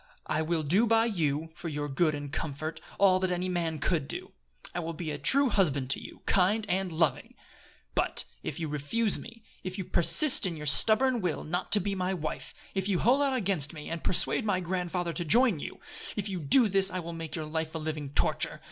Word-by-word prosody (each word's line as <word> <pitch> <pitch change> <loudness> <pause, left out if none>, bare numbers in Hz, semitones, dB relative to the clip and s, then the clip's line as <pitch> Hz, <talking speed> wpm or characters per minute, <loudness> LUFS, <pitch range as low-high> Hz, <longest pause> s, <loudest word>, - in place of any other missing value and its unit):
I 155 - -1
will 160 0 -1
do 190 +11 +2
by 225 0 +3
you, 160 -7 -1
for 165 - -7
your 145 -1 -4
good 155 +2 0
and 145 -1 -7
comfort, 155 +1 -5 0.2
all 185 -2 +4
that 185 0 -1
any 180 +1 -2
man 170 -3 -2
could 150 -1 -1
do. - - -6 0.4
I 175 - -3
will 165 -1 -4
be 155 -1 -5
a 145 - -5
true 275 0 +5
husband 145 - +1
to - - -1
you, - - -12
kind 200 +4 +2
and 190 -1 -1
loving. 160 -1 -1 0.6
But - - +1 0.2
if 145 - -6
you 160 - -3
refuse 150 +10 0
me, 230 -1 -12 0.2
if 185 0 -5
you 190 - -3
persist 180 - +6
in 170 - -4
your 150 - -7
stubborn 225 - +3
will 175 -5 -2
not 175 +4 -4
to 210 - +8
be 200 +1 -2
my 185 0 -2
wife, 155 -3 -5 0.2
if 190 -1 -2
you 195 -3 +1
hold 250 +9 +3
out 275 -2 +1
against 185 - 0
me 150 0 -9
and 165 -1 -5
persuade 185 - +4
my 205 -4 0
grandfather 180 -1 -3
to 175 - -3
join 225 - +4
you, - - -8 0.4
if 210 - -3
you 190 -3 -4
do 220 - +4
this 195 -1 +3
I 185 - -5
will 170 -1 -7
make 165 -1 -6
your 160 -2 -4
life 160 +1 -4
a - - -1
living 155 -2 -5
torture! 140 - -1
175 Hz, 220 wpm, -28 LUFS, 155-200 Hz, 0.6 s, to